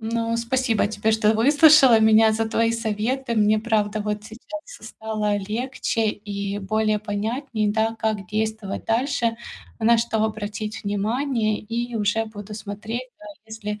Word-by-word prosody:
Ну 230 +1 -1
спасибо 230 -1 +1
тебе, 215 +1 -1
что 220 -1 +3
выслушала 285 +1 +6
меня, 220 0 +5
за 225 +1 -1
твои 230 +1 +1
советы. 230 +3 -2
Мне, 215 0 +3
правда, 215 -2 0
вот 210 0 -3
сейчас 240 +8 -9 0.3
стало 215 -2 -2
легче 225 +2 -2
и 200 -1 -5
более 215 +1 0
понятней, 215 +2 -2
да, 225 +1 0
как 215 -3 -1
действовать 215 -1 -3
дальше, 235 0 0 0.4
на 230 +1 +4
что 230 -1 0
обратить 215 0 -4
внимание, 215 +2 0
и 235 +2 -4
уже 215 +1 0
буду 210 -1 -9
смотреть, 215 +4 -6
да - - -15 0.2
если, 215 -1 -6
220 Hz, 140 wpm, -23 LUFS, 210-230 Hz, 0.4 s, выслушала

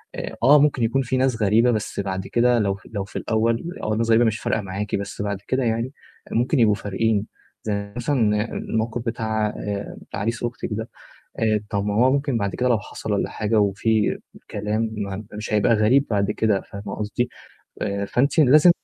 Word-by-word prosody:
آآ - - -5
آه، 145 +4 +8
ممكن 140 -4 +2
يكون 120 +4 +2
فيه 130 0 -1
ناس 130 -4 +1
غريبة 115 +4 +4
بس 110 -2 -3
بعد 95 -1 -3
كده 120 0 +3
لو 100 -2 +1
ف 95 - -16
لو 100 -2 -2
في 100 - -14
الأول، 115 +1 +1
الأول 120 - -4
الناس 115 +1 0
الغريبة 115 +1 +5
مش 110 -1 0
فارقة 110 - 0
معاكِ 100 +1 -3
بس 100 0 -4
بعد 100 -1 -2
كده 130 0 +1
يعني 115 +3 -1 0.4
ممكن 125 +4 +1
يبقوا 105 -3 +5
فارقين 105 +1 0 0.4
زَي 100 -1 -3
مثلًا 115 -4 +1
الموقف 115 +2 -2
بتاع 110 -2 -1
آآ 100 -1 -5 0.2
عريس 115 +4 -2
أختِك 120 0 -3
ده، 110 +2 -3 0.5
آآ 110 -2 +2
طَب 100 -1 0
ما 105 - 0
هو 125 +5 +4
ممكن 140 -3 0
بعد 100 -2 -2
كده 125 - +1
لو 120 -3 +3
حصَل - - -6
والّا - - 0
حاجة 110 0 +1
وفيه 105 +2 +1 0.3
كلام 105 +2 -1
م 100 -1 -5
مش 105 +1 -5
هيبقى 105 +2 +4
غريب 120 +7 +4
بعد 100 -1 +1
كده، 105 -2 +1
فاهمة 100 0 -8
قصدي. 110 +3 -1 0.5
آآ 100 -1 -1
فأنتِ 140 +9 +1
لازم 150 +4 +7
110 Hz, 190 wpm, -23 LUFS, 105-120 Hz, 0.5 s, آه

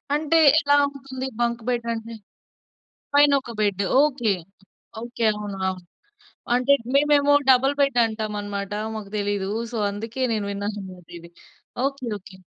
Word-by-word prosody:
అంటే 310 +2 +1 0.2
ఎలా 285 -2 +3
ఉంటుంది? 265 -1 -7
బంక్ 235 0 0
బడ్ 240 -1 0
అంటే? 230 0 -7 1.0
పైన 290 0 +6
ఒక 245 -3 -9
బెడ్ 200 -2 +1 0.2
ఓకె, 260 -8 +2 0.7
ఓకె 235 0 -4
అవును, 205 -1 -6
అవును 185 -1 -5 0.7
అంటే 250 +3 +3 0.2
మేమేమో 290 0 +4 0.2
డబుల్ 265 +2 +4
బెడ్ 275 -3 +2
అంటామనమాట, 205 -2 -4 0.2
మాకు 210 -2 -7
తెలీదు. 200 -1 -2 0.2
సో, - - -4
అందుకే 225 +5 -5
నేను 215 -2 -1
విన్నానన్నమాట 200 -3 -6
ఇది. 170 0 -14 0.5
Okay, 275 -2 -2
okay. 195 0 -15
230 Hz, 130 wpm, -23 LUFS, 205-270 Hz, 1.0 s, పైన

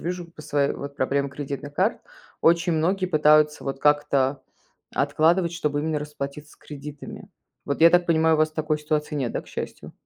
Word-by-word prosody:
вижу 175 0 -4
по 165 -2 -14
своей 145 -2 0
вот 140 0 -8
проблемы 140 +1 0
кредитных 140 0 -6
карт. 190 +8 +1 0.4
Очень 170 +1 +3
многие 185 +4 +1
пытаются 150 -2 +4
вот 135 0 -4
как-то 145 -2 +2 0.5
откладывать, 170 +2 +2
чтобы 150 -4 -1
именно 155 0 -1
расплатиться 150 0 -7
с - - -19
кредитами. 145 0 -10 0.4
Вот 140 - -3
я 165 +1 +8
так 175 0 +3
понимаю, 160 -1 +3
у - - 0
вас 155 0 +3
такой 155 -1 -1
ситуации 150 0 -2
нет, 130 -5 -2
да, - - -2
к - - -24
счастью? - - -7
150 Hz, 180 wpm, -24 LUFS, 145-165 Hz, 0.5 s, я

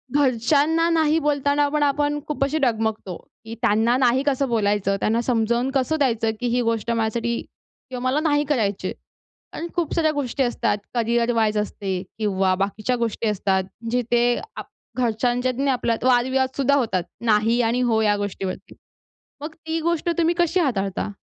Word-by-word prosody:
घरच्यांना 290 +5 +2
नाही 320 -1 +2
बोलताना 285 -1 +1
आपण, 295 +1 0
आपण 290 +1 +1
खूप 295 -2 -1
अशी 290 +3 -1
डगमगतो, 220 -5 -2 0.3
की 225 +1 -7
त्यांना 230 +2 +3
नाही 260 +1 +2
कसं 275 -1 +1
बोलायचं, 205 -3 +1
त्यांना 225 +2 +1
समजावून 240 +1 0
कसं 270 +4 +1
द्यायचं, 230 -5 +1
की 245 - -1
ही 245 +1 +1
गोष्ट 230 0 -1
माझ्यासाठी 230 +1 -1 0.5
किंवा 250 -1 -5
मला 275 +4 +1
नाही 290 0 +2
करायची 220 -9 -1
आहे - - -5 0.6
आणि 340 - -4
खूप 340 -4 -1
साऱ्या 315 -2 +2
गोष्टी 275 -2 -1
असतात. 235 -3 0 0.2
करियर 235 0 +1
वाईज 220 -2 +1
असते 195 -3 -2 0.2
किंवा 195 -3 +1
बाकीच्या 205 +5 -1
गोष्टी 230 -1 -2
असतात. 190 -2 0 0.3
जिथे 240 0 +1 0.2
आप - - -7 0.3
घरच्यांच्यात 245 +2 0
आणि 280 0 +1
आपल्यात 235 -3 -1
वाद-विवाद 260 +1 +2
सुद्धा 280 0 +3
होतात. 220 -10 0 0.2
नाही 225 +2 +3
आणि 235 +2 +1
हो 230 -3 +2
या 210 -1 +3
गोष्टीवरती. 195 -2 -5 0.7
मग 310 +1 -6
ती 320 0 -4
गोष्ट 340 +1 0
तुम्ही 335 0 +2
कशी 345 +1 +2
हाताळता? 200 - -1
240 Hz, 160 wpm, -22 LUFS, 220-285 Hz, 0.7 s, त्यांना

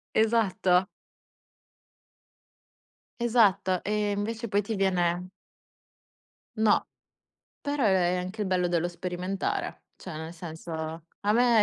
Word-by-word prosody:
Esatto. 195 -5 +3 2.3
Esatto. 205 -6 +3
E 210 0 0
invece 225 +3 -2
poi 205 0 +2
ti 215 +2 -3
viene 180 -2 +1 1.3
No, 215 -1 +3 0.7
però 285 -3 -1
è 185 -3 +3
è - - 0
anche 185 +4 -3
il - - -1
bello 180 -1 +1
dello 175 0 +1
sperimentare. 180 +2 -3
Cioè 175 -5 -8
nel 160 +2 -6
senso, 165 0 -8 0.5
a 205 +1 +2
me 235 -2 +5
190 Hz, 110 wpm, -28 LUFS, 180-215 Hz, 2.3 s, me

